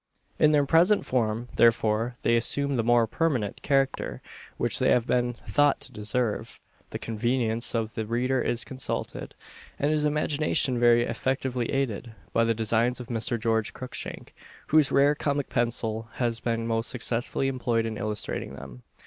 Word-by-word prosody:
In 155 Hz, -, +5 dB
their 145 Hz, -2 st, +3 dB
present 170 Hz, +8 st, +4 dB
form, 115 Hz, -1 st, -1 dB
therefore, 115 Hz, +1 st, +3 dB
they 115 Hz, -, +3 dB
assume 140 Hz, +4 st, +1 dB
the 120 Hz, -, +2 dB
more 120 Hz, 0 st, +4 dB
permanent 120 Hz, -5 st, -1 dB
character 135 Hz, -2 st, 0 dB, 0.4 s
which -, -, 0 dB
they -, -, +3 dB
have 120 Hz, -2 st, +3 dB
been 120 Hz, -1 st, +1 dB
thought 145 Hz, -1 st, +3 dB
to -, -, -7 dB
deserve; 105 Hz, +1 st, -2 dB, 0.3 s
the -, -, -4 dB
convenience 115 Hz, +1 st, -1 dB
of 110 Hz, -1 st, -1 dB
the 110 Hz, -1 st, -4 dB
reader 125 Hz, +3 st, 0 dB
is 120 Hz, -, -2 dB
consulted, 130 Hz, -1 st, -5 dB, 0.4 s
and 145 Hz, +2 st, +1 dB
his 155 Hz, -1 st, +1 dB
imagination 150 Hz, -3 st, +1 dB
very 120 Hz, 0 st, +5 dB
effectively 125 Hz, 0 st, -2 dB
aided, 120 Hz, -4 st, -2 dB, 0.2 s
by 115 Hz, -, +3 dB
the 115 Hz, 0 st, +1 dB
Designs 115 Hz, +3 st, +1 dB
of 125 Hz, 0 st, -8 dB
Mr. 115 Hz, 0 st, -1 dB
George 110 Hz, -1 st, 0 dB
Cruikshank, 130 Hz, -1 st, -6 dB, 0.4 s
whose 155 Hz, -2 st, +4 dB
rare 140 Hz, +1 st, +4 dB
comic 145 Hz, -1 st, -2 dB
pencil 115 Hz, -2 st, -1 dB
has 120 Hz, -2 st, -1 dB
been 115 Hz, -1 st, -2 dB
most 115 Hz, 0 st, 0 dB
successfully 120 Hz, +1 st, -1 dB
employed 120 Hz, -3 st, 0 dB
in 110 Hz, -1 st, -3 dB
illustrating 105 Hz, -1 st, -4 dB
them. 60 Hz, +1 st, -10 dB
120 Hz, 155 wpm, -27 LUFS, 115-135 Hz, 0.4 s, In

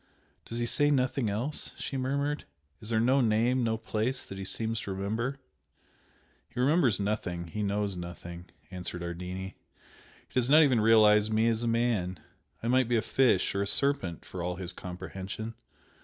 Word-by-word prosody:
"Does 115 Hz, -, -6 dB
he 120 Hz, -, 0 dB
say 145 Hz, +5 st, +2 dB
nothing 130 Hz, -4 st, +1 dB
else?" 120 Hz, +9 st, -3 dB
she -, -, -5 dB
murmured 140 Hz, +3 st, -1 dB, 0.3 s
"Is 110 Hz, -, -5 dB
there 110 Hz, -1 st, +2 dB
no 130 Hz, +4 st, +4 dB
name 120 Hz, +3 st, +2 dB
no 110 Hz, -1 st, +1 dB
place 115 Hz, +3 st, -2 dB
that 95 Hz, -, -8 dB
he -, -, -4 dB
seems 110 Hz, +2 st, 0 dB
to 100 Hz, -, -5 dB
remember?" 110 Hz, +8 st, -2 dB, 1.1 s
"He -, -, -7 dB
remembers 130 Hz, -, +3 dB
nothing 90 Hz, -5 st, -2 dB
he 105 Hz, -, -4 dB
knows 100 Hz, -1 st, -1 dB
nothing" 85 Hz, 0 st, -8 dB, 0.3 s
answered 90 Hz, -1 st, -5 dB
Ardini 90 Hz, +2 st, -5 dB, 0.7 s
"He -, -, -27 dB
does 125 Hz, 0 st, +2 dB
not 155 Hz, +3 st, +8 dB
even 130 Hz, -6 st, +3 dB
realize 105 Hz, -1 st, +6 dB
me 110 Hz, +1 st, +2 dB
as 115 Hz, 0 st, 0 dB
a 120 Hz, -, -1 dB
man 115 Hz, -6 st, 0 dB, 0.4 s
I -, -, -1 dB
might 130 Hz, 0 st, +3 dB
be 120 Hz, -1 st, +2 dB
a -, -, +2 dB
fish 130 Hz, -2 st, +2 dB
or 100 Hz, -, 0 dB
a 100 Hz, -, 0 dB
serpent 140 Hz, -, +2 dB
for 90 Hz, -, -6 dB
all 90 Hz, +1 st, -2 dB
his 90 Hz, 0 st, -3 dB
comprehension. 95 Hz, +5 st, -6 dB
110 Hz, 175 wpm, -29 LUFS, 95-125 Hz, 1.1 s, not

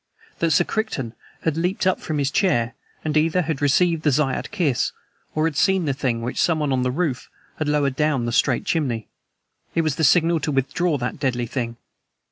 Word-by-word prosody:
That 165 Hz, -, +2 dB
Sir -, -, +4 dB
Crichton 145 Hz, -, -3 dB, 0.3 s
had 160 Hz, -2 st, +1 dB
leaped 180 Hz, +5 st, 0 dB
up 185 Hz, -, +2 dB
from 155 Hz, -, -3 dB
his 140 Hz, -1 st, 0 dB
chair, 130 Hz, -, +1 dB, 0.3 s
and 155 Hz, -1 st, -1 dB
either 165 Hz, +4 st, +3 dB
had 155 Hz, -3 st, -3 dB
received 165 Hz, +3 st, +3 dB
the 155 Hz, -, +2 dB
Zayat 135 Hz, -1 st, 0 dB
Kiss 165 Hz, -, 0 dB, 0.4 s
or 155 Hz, 0 st, +2 dB
had 160 Hz, -2 st, -1 dB
seen 190 Hz, +2 st, +3 dB
the 140 Hz, -, +1 dB
thing 125 Hz, -4 st, -1 dB
which 120 Hz, -, -1 dB
someone 155 Hz, -5 st, +1 dB
on 130 Hz, -, +1 dB
the 125 Hz, -, +1 dB
roof 140 Hz, -2 st, -2 dB, 0.3 s
had 155 Hz, -, -1 dB
lowered 145 Hz, -3 st, +1 dB
down 150 Hz, -5 st, +1 dB
the 120 Hz, -, -1 dB
straight 125 Hz, +1 st, +2 dB
chimney. 125 Hz, -9 st, -1 dB, 0.7 s
It 165 Hz, -, +3 dB
was 155 Hz, -4 st, -1 dB
the 160 Hz, -, 0 dB
signal 165 Hz, +2 st, +4 dB
to 150 Hz, -, -2 dB
withdraw 145 Hz, +4 st, 0 dB
that 125 Hz, +1 st, -4 dB
deadly 125 Hz, -4 st, 0 dB
thing. 115 Hz, -1 st, -4 dB
150 Hz, 200 wpm, -23 LUFS, 130-165 Hz, 0.7 s, Sir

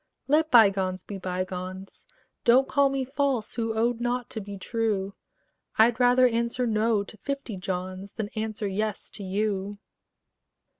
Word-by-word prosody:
Let 310 Hz, +3 st, +3 dB
bygones 195 Hz, -, +4 dB
be 200 Hz, -2 st, -7 dB
bygones: 185 Hz, +1 st, -5 dB, 0.4 s
Don't 255 Hz, +3 st, +5 dB
call 280 Hz, -1 st, +3 dB
me 270 Hz, -1 st, -1 dB
false, 270 Hz, -4 st, -1 dB
who 225 Hz, -1 st, -2 dB
owed 235 Hz, +1 st, +1 dB
not 245 Hz, 0 st, -2 dB
to 220 Hz, -, -4 dB
be 200 Hz, 0 st, -7 dB
true: 205 Hz, -2 st, -1 dB, 0.6 s
I'd 225 Hz, +2 st, +5 dB
rather 250 Hz, +1 st, +5 dB
answer 235 Hz, +1 st, 0 dB
"No" 220 Hz, -2 st, +2 dB
to 215 Hz, -, -12 dB
fifty 275 Hz, -2 st, -4 dB
Johns 185 Hz, +1 st, -5 dB
Than 215 Hz, -2 st, -4 dB
answer 215 Hz, -1 st, -3 dB
"Yes" 210 Hz, +2 st, -3 dB
to 205 Hz, -, -6 dB
you. 200 Hz, +1 st, -2 dB
220 Hz, 145 wpm, -27 LUFS, 195-245 Hz, 0.6 s, Don't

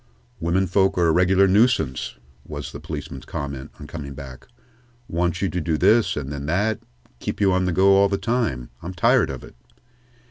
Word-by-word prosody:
"Women 85 Hz, +4 st, +1 dB
folks 95 Hz, +1 st, +2 dB
are 90 Hz, -, +3 dB
a 80 Hz, -, +4 dB
regular 95 Hz, +3 st, +4 dB
nuisance," 95 Hz, -, +2 dB, 0.3 s
was 75 Hz, 0 st, -7 dB
the -, -, -8 dB
policeman's -, -, -7 dB
comment, 70 Hz, -2 st, -5 dB
on 75 Hz, -, -9 dB
coming 70 Hz, -3 st, -7 dB
back. 65 Hz, -3 st, -10 dB, 0.6 s
"Want 85 Hz, +2 st, -1 dB
you 95 Hz, -, +1 dB
to 90 Hz, -, -2 dB
do 80 Hz, -1 st, 0 dB
this 105 Hz, -1 st, +3 dB
and 70 Hz, -1 st, -4 dB
then 70 Hz, 0 st, -5 dB
that 105 Hz, +7 st, +1 dB, 0.4 s
keep -, -, -4 dB
you 100 Hz, -2 st, +3 dB
on 95 Hz, 0 st, +2 dB
the 90 Hz, -, +1 dB
go 95 Hz, +3 st, +4 dB
all 100 Hz, 0 st, +5 dB
the 100 Hz, -, 0 dB
time. 110 Hz, -, -1 dB
I'm 90 Hz, +3 st, -7 dB
tired 85 Hz, -, +3 dB
of 65 Hz, -2 st, -6 dB
it." -, -, -12 dB
90 Hz, 190 wpm, -23 LUFS, 75-95 Hz, 0.6 s, all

